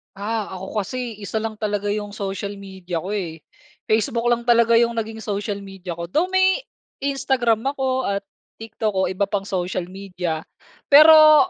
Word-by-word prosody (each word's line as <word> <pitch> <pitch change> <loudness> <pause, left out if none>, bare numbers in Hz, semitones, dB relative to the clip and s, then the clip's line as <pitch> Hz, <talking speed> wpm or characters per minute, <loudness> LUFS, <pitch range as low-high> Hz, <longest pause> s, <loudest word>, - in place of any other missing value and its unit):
Ah, 210 +1 -2
ako 190 +3 -6
kasi 245 -3 -5
isa 215 +1 -3
lang 220 -1 -4
talaga 205 -1 -1
'yung 205 0 -3
social 200 0 -4
media 190 -4 -6
ko 190 - -6
eh. 170 -6 -4 0.5
Facebook 230 +2 +1
lang 235 0 +1
talaga 235 -1 +5
'yung 235 0 +3
naging 225 -1 -4
social 205 -1 -3
media 195 -3 -8
ko. 170 - -4
Though 315 - 0
may, 380 +4 +3 0.4
Instagram 265 -4 +1
ako 260 -1 -1
at 200 0 -1 0.4
TikTok 220 -1 -2
o 190 -1 +1
iba 190 +2 0
pang 200 0 -1
social 185 -2 -3
media. 180 -4 -4 0.4
Pero, 310 +2 +8
210 Hz, 160 wpm, -22 LUFS, 195-235 Hz, 0.5 s, Pero